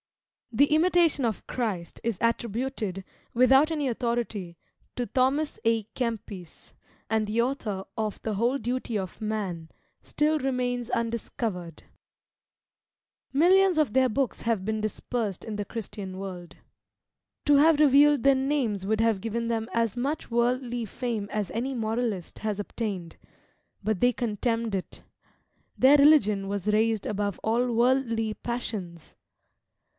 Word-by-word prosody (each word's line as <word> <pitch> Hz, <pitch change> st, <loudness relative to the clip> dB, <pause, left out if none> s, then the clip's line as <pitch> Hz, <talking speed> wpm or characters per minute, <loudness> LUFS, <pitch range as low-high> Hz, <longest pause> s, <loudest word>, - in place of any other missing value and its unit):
The 265 Hz, +5 st, +5 dB
"Imitation 335 Hz, -3 st, +3 dB
of 225 Hz, -4 st, -2 dB
Christ" 200 Hz, -9 st, -3 dB
is 230 Hz, -4 st, -1 dB
attributed, 230 Hz, -4 st, -2 dB, 0.3 s
without 265 Hz, +5 st, +5 dB
any 300 Hz, -3 st, -1 dB
authority, 230 Hz, -7 st, -2 dB, 0.4 s
to 245 Hz, -, -1 dB
Thomas 270 Hz, +5 st, 0 dB
A'Kempis; 225 Hz, -5 st, -3 dB, 0.4 s
and 220 Hz, -1 st, +1 dB
the 215 Hz, +3 st, +1 dB
author 220 Hz, -7 st, -2 dB
of 215 Hz, -2 st, -3 dB
the 220 Hz, -, -2 dB
"Whole 235 Hz, +6 st, +1 dB
Duty 245 Hz, -3 st, -2 dB
of 190 Hz, 0 st, -6 dB
Man" 195 Hz, -7 st, -3 dB, 0.3 s
still 305 Hz, +1 st, +1 dB
remains 250 Hz, -3 st, -1 dB
undiscovered. 225 Hz, -6 st, -3 dB, 1.5 s
Millions 365 Hz, +5 st, +4 dB
of 300 Hz, -8 st, +2 dB
their 260 Hz, 0 st, +4 dB
books 265 Hz, +2 st, -1 dB
have 225 Hz, -5 st, -1 dB
been 220 Hz, 0 st, -1 dB
dispersed 215 Hz, -1 st, -3 dB
in 220 Hz, -, -5 dB
the 205 Hz, -, -2 dB
Christian 200 Hz, -3 st, -7 dB
world. 185 Hz, -3 st, -7 dB, 0.9 s
To 290 Hz, -1 st, +5 dB
have 305 Hz, +1 st, +5 dB
revealed 290 Hz, -2 st, +5 dB
their 275 Hz, 0 st, +6 dB
names 265 Hz, -8 st, 0 dB
would 215 Hz, +2 st, 0 dB
have 225 Hz, -4 st, +2 dB
given 230 Hz, +2 st, -2 dB
them 225 Hz, 0 st, -2 dB
as 230 Hz, -3 st, 0 dB
much 275 Hz, +3 st, -3 dB
worldly 240 Hz, 0 st, 0 dB
fame 225 Hz, -2 st, -4 dB
as 210 Hz, -4 st, -2 dB
any 260 Hz, +4 st, -2 dB
moralist 220 Hz, -5 st, -2 dB
has 210 Hz, -2 st, -2 dB
obtained 200 Hz, -5 st, -4 dB, 0.7 s
but 215 Hz, -2 st, 0 dB
they 245 Hz, 0 st, +5 dB
contemned 230 Hz, -1 st, -2 dB
it! 185 Hz, -, -6 dB, 0.7 s
Their 270 Hz, +3 st, +7 dB
religion 240 Hz, -10 st, +5 dB
was 200 Hz, -1 st, -3 dB
raised 220 Hz, -1 st, +2 dB
above 205 Hz, -1 st, -2 dB
all 240 Hz, +3 st, +1 dB
worldly 230 Hz, -2 st, +1 dB
passions! 205 Hz, -9 st, -5 dB
230 Hz, 130 wpm, -27 LUFS, 210-255 Hz, 1.5 s, Their